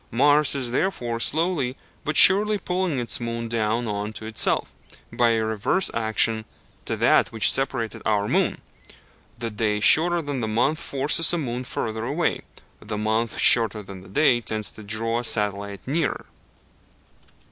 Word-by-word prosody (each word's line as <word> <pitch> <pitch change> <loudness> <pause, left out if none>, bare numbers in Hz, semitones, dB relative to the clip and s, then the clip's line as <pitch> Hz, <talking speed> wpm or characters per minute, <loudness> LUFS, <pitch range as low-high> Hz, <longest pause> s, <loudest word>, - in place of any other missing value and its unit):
Mars 145 +4 +3
is 130 -3 -1
therefore 120 -6 -2
slowly 150 -2 0 0.3
but 155 - -3
surely 210 +2 +7
pulling 180 -5 -2
its 120 -2 -2
moon 115 0 -5
down 115 +1 -2
on 105 +1 -4
to 110 - -8
itself, 110 0 0 0.4
by 115 -1 +2
a 110 -1 -1
reverse 110 - -1
action 110 0 +1 0.4
to - - -3
that - - +3
which 110 -1 +4
separated 130 -4 -3
our 105 -1 0
moon. - - -1 0.8
The 115 -1 -5
day 105 0 -1
shorter 170 +9 +4
than 145 -3 -4
the 110 - -2
month 120 +8 0
forces 145 +3 +2
a - - 0
moon 125 -5 -4
further 110 -2 -5
away; 145 +8 -2 0.4
the 105 0 -6
month 110 +2 -2
shorter 110 -3 +4
than 95 -1 -11
the 95 - -15
day 125 +2 +2
tends 110 -2 -4
to - - -13
draw 115 +3 -2
a - - -5
satellite 100 -3 -2
nearer. 150 -1 -2
115 Hz, 160 wpm, -23 LUFS, 110-145 Hz, 0.8 s, surely